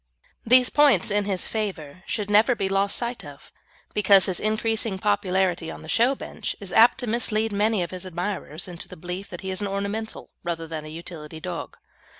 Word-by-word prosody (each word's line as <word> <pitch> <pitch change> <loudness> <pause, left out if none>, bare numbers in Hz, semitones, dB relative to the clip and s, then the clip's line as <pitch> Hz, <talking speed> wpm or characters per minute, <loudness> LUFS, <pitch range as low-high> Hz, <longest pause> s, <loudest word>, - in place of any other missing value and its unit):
These 250 +2 +5
points 280 - +4
in 205 0 +1
his 195 -3 0
favour 185 -8 -4
should 210 -3 -2
never 220 +4 +5
be 195 - -1
lost 195 +1 +1
sight 240 0 -3
of, 145 -2 -12 0.4
because 200 -2 +5
his 185 -2 +1
increasing 220 -1 0
popularity 180 - 0
on - - -8
the - - -11
show 240 - +3
bench - - -5
is 195 -3 -5
apt 230 +2 +6
to - - -3
mislead 225 -1 +1
many 205 -1 +1
of 170 - -6
his 185 0 -5
admirers 180 -2 -4
into 175 -2 -6
the - - -11
belief 180 +4 -6
that 175 - -8
he 190 -1 -4
is 185 - -3
an 205 - -1
ornamental 200 +3 -4
rather 165 -1 -3
than 160 -1 -6
a - - -8
utility 160 -1 -8
dog. 175 +1 -6
195 Hz, 195 wpm, -25 LUFS, 175-215 Hz, 0.4 s, apt